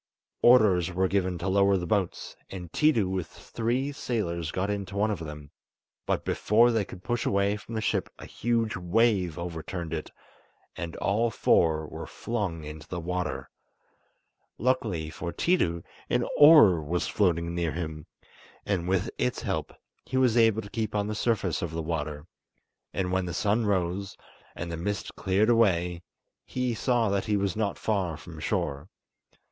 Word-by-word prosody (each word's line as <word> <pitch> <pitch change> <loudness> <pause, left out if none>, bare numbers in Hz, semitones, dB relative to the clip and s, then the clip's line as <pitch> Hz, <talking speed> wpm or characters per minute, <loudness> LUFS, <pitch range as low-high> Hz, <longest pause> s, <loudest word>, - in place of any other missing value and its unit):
Orders 100 -8 +5
were 95 +1 +1
given 95 -2 0
to 85 - -4
lower 100 0 +4
the 90 - -3
boats, 95 0 -1
and 90 -3 -8
Tiidu 145 -11 +3
with 95 -3 -2
three 125 +5 -2
sailors 85 - -2
got 95 +5 -1
into 100 -1 -4
one 105 +2 +2
of 100 - -3
them, 75 -2 -8 0.6
but - - 0
before 115 +3 +4
they 110 -3 +1
could 90 -1 -11
push 120 0 -1
away 100 +1 +1
from 105 +3 -8
the 110 - -1
ship - - 0
a - - -10
huge 115 -1 -1
wave 95 -1 +1
overturned 85 0 -5
it, 80 - -4 0.7
and 85 -1 -5
all 110 +4 +1
four 80 -7 +2
were - - -7
flung 100 -9 -3
into 75 0 -9
the 90 - -4
water. 85 -7 -3 1.1
Luckily 105 -10 0
for 85 +2 -5
Tiidu 85 - +1 0.3
an - - +1
oar 145 - +8
was 85 +4 -1
floating 85 -4 +1
near 85 -3 -1
him, 80 -2 -5 0.6
and 90 -4 -1
with 95 +3 0
its 125 -1 -1
help 95 -9 -2 0.3
he 130 - -3
was 125 -3 +3
able 110 -2 +4
to 100 - -11
keep 110 -1 -2
on 100 -1 +1
the 105 - -3
surface 105 -5 0
of 85 - -2
the 80 0 -3
water; 75 -2 -3 0.7
and 90 -2 -2
when 95 0 +1
the 85 - -4
sun 105 +1 +1
rose, 95 0 -1 0.4
and 85 0 -5
the 85 - -3
mist 100 +5 -3
cleared 100 +4 +2
away, 90 -7 +2 0.4
he 125 -1 -2
saw 120 0 +1
that 100 -1 0
he 105 -2 +1
was 100 -2 -1
not 105 -2 -1
far 95 -7 -1
from - - -11
shore. 70 +6 -2
95 Hz, 165 wpm, -28 LUFS, 85-110 Hz, 1.1 s, oar